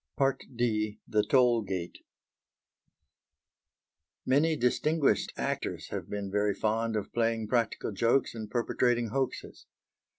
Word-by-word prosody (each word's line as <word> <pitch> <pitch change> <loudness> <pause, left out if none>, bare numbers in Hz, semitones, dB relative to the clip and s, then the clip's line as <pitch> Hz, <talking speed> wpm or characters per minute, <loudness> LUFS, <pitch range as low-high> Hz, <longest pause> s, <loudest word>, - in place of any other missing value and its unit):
D. 110 -3 0
THE 110 -2 +2
TOLL 120 +1 +4
GATE 95 -4 -5 2.3
Many 150 +5 +3
distinguished 150 +4 +1
actors - - -3
have - - -5
been 100 -1 -4
very 105 0 +1
fond 110 +2 0
of 105 - -3
playing 115 -2 0
practical 120 -2 0
jokes 115 +6 +2
and 110 -2 -6
perpetrating 120 0 +1
hoaxes. 135 +2 -3
115 Hz, 105 wpm, -29 LUFS, 105-125 Hz, 2.3 s, TOLL